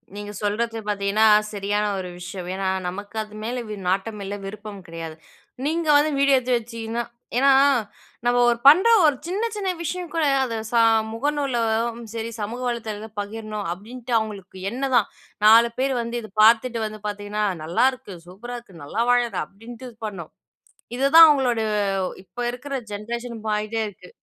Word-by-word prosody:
நீங்க 205 Hz, 0 st, -6 dB
சொல்றது 225 Hz, +3 st, -1 dB
பாத்தீங்கன்னா, 205 Hz, +1 st, +2 dB, 0.3 s
சரியான 205 Hz, +1 st, -1 dB
ஒரு 180 Hz, -1 st, -5 dB
விஷயம். 180 Hz, 0 st, -7 dB
ஏன்னா, 190 Hz, 0 st, -2 dB, 0.2 s
நமக்கு 205 Hz, +4 st, -7 dB
அது 210 Hz, 0 st, -15 dB
மேல 245 Hz, +2 st, -3 dB
வி 210 Hz, -, -4 dB
நாட்டம் 200 Hz, +3 st, -1 dB
இல்ல, 200 Hz, +1 st, -4 dB
விருப்பம் 205 Hz, 0 st, -8 dB
கெடயாது. 165 Hz, -1 st, -7 dB, 0.5 s
நீங்க 325 Hz, +2 st, -1 dB
வந்து 295 Hz, +2 st, +4 dB
வீடியோ 280 Hz, 0 st, +5 dB
எடுத்து 255 Hz, 0 st, 0 dB
வச்சிக்கின்னா 230 Hz, 0 st, -4 dB, 0.4 s
ஏன்னா 275 Hz, +2 st, +5 dB, 0.8 s
நம்ம 245 Hz, 0 st, +3 dB
ஒரு 235 Hz, -1 st, +1 dB
பண்ற 360 Hz, +10 st, +8 dB, 0.2 s
ஒரு 295 Hz, -2 st, +4 dB
சின்ன 405 Hz, +7 st, -1 dB
சின்ன 395 Hz, -2 st, -2 dB
விஷயம் 350 Hz, +1 st, -4 dB
கூட 330 Hz, -1 st, +1 dB, 0.2 s
அத 235 Hz, -3 st, -3 dB
சா 235 Hz, -, +2 dB, 0.3 s
முகநூலும் 235 Hz, -4 st, 0 dB
செரி, 230 Hz, 0 st, -4 dB
சமூக 225 Hz, +4 st, -4 dB
வளைத்தலதுல 220 Hz, -2 st, -4 dB
பகிரணும் 215 Hz, -1 st, -5 dB
அப்டின்ட்டு 240 Hz, +6 st, -8 dB
அவங்களுக்கு 200 Hz, -4 st, -7 dB
எண்ணம் 260 Hz, +3 st, -2 dB
தான். 230 Hz, -4 st, +3 dB, 0.4 s
4 230 Hz, +2 st, +8 dB
பேரு 270 Hz, +1 st, +1 dB
வந்து 235 Hz, +1 st, -5 dB
இத 215 Hz, -, -10 dB
பாத்துட்டு 230 Hz, +2 st, +5 dB
வந்து 215 Hz, 0 st, -6 dB
பாத்தீங்கன்னா, 205 Hz, +1 st, -3 dB, 0.2 s
நல்லாருக்கு, 250 Hz, +6 st, 0 dB
சூப்பரா 230 Hz, +7 st, -8 dB
இருக்கு, 190 Hz, -9 st, -16 dB
நல்லா 185 Hz, +11 st, -1 dB
வாழுற 240 Hz, -4 st, +2 dB
அப்டின்ட்டு 230 Hz, +5 st, -11 dB
இது 235 Hz, -, -17 dB
பண்ணணும். 185 Hz, -7 st, -7 dB, 0.7 s
இதுதான் 285 Hz, +5 st, +8 dB
அவங்களோட 260 Hz, -6 st, +2 dB, 0.6 s
இப்ப 190 Hz, -, -23 dB
இருக்குற 275 Hz, +3 st, -7 dB, 0.2 s
ஜென்ரேஷன் 235 Hz, +3 st, -5 dB
மாறிட்டே 215 Hz, +1 st, -1 dB
இருக்கு. 185 Hz, -3 st, -14 dB
225 Hz, 155 wpm, -23 LUFS, 205-250 Hz, 0.8 s, பண்ற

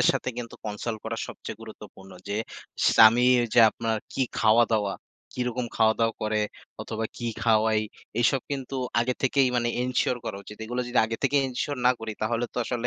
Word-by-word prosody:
এর -, -, +4 dB
সাথে -, -, -2 dB
কিন্তু 115 Hz, -1 st, -6 dB
কনসাল্ট 110 Hz, +1 st, -4 dB
করা 115 Hz, +1 st, -3 dB
সবচেয়ে 110 Hz, -, -8 dB
গুরুত্বপূর্ণ। 100 Hz, -3 st, -12 dB, 0.2 s
যে, 100 Hz, -, -2 dB, 0.6 s
স্বামী 115 Hz, +3 st, +7 dB, 0.3 s
যে, -, -, +4 dB
আপনার 115 Hz, -1 st, -2 dB, 0.2 s
কি 135 Hz, -, -4 dB, 0.2 s
খাওয়া-দাওয়া 110 Hz, -2 st, +3 dB, 0.4 s
কি 125 Hz, -, -6 dB
রকম 125 Hz, 0 st, -3 dB
খাওয়া-দাওয়া 115 Hz, 0 st, +3 dB
করে 110 Hz, 0 st, 0 dB, 0.4 s
অথবা 110 Hz, 0 st, -4 dB
কি 120 Hz, -, -4 dB, 0.2 s
খাওয়াই 110 Hz, -1 st, +3 dB, 0.4 s
এসব 130 Hz, +2 st, +3 dB
কিন্তু 135 Hz, -1 st, -4 dB, 0.2 s
আগে 125 Hz, +2 st, 0 dB
থেকেই 135 Hz, 0 st, +3 dB
মানে 120 Hz, -1 st, +1 dB
এনশিওর 125 Hz, 0 st, 0 dB
করা -, -, -4 dB
উচিত। 105 Hz, -, -10 dB
এগুলো 120 Hz, +3 st, -3 dB
যদি 120 Hz, -, 0 dB
আগে 115 Hz, -, -3 dB
থেকেই 140 Hz, 0 st, +3 dB
এনশিওর 130 Hz, +2 st, -3 dB
না 125 Hz, -, +7 dB
করি 110 Hz, -1 st, -4 dB
তাহলে 115 Hz, +2 st, 0 dB
তো -, -, -22 dB
আসলে 120 Hz, +1 st, -2 dB
115 Hz, 175 wpm, -26 LUFS, 110-125 Hz, 0.6 s, স্বামী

